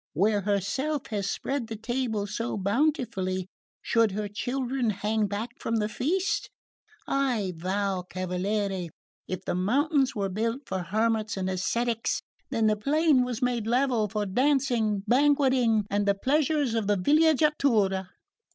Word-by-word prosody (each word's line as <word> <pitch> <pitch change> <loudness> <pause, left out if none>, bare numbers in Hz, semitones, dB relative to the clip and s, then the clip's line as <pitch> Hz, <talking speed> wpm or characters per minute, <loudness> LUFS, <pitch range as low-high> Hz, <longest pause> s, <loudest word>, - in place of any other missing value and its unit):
Where 205 +5 +2
herself 210 - -1
has 200 -2 -1
spread 270 -4 -2
the 225 - -5
table 225 -2 -2
so 220 +3 -3
bountifully, 200 - 0 0.4
should 225 -4 +2
her 210 +1 -2
children 250 +3 -2
hang 210 +1 0
back 210 +4 -4
from 230 - -2
the 210 -2 +1
feast? 350 - -1 0.6
I 245 -9 0
vow, 190 +2 -1
cavaliere, 185 0 -2 0.4
if 185 0 -5
the - - -1
mountains 270 - +1
were 200 -2 -1
built 230 +7 -2
for 190 - -3
hermits 215 +4 0
and 185 -1 -2
ascetics, 230 +5 -1 0.3
then 230 -5 +1
the 215 0 +4
plain 285 +3 +3
was 250 0 -3
made 240 -3 0
level 240 -3 +2
for 210 0 -2
dancing, 240 -2 +1
banqueting 260 -4 +3
and 205 0 +1
the 200 - +3
pleasures 285 +2 +1
of 225 -3 -1
the 205 -1 +2
villeggiatura. 280 - +3
220 Hz, 140 wpm, -27 LUFS, 200-265 Hz, 0.6 s, the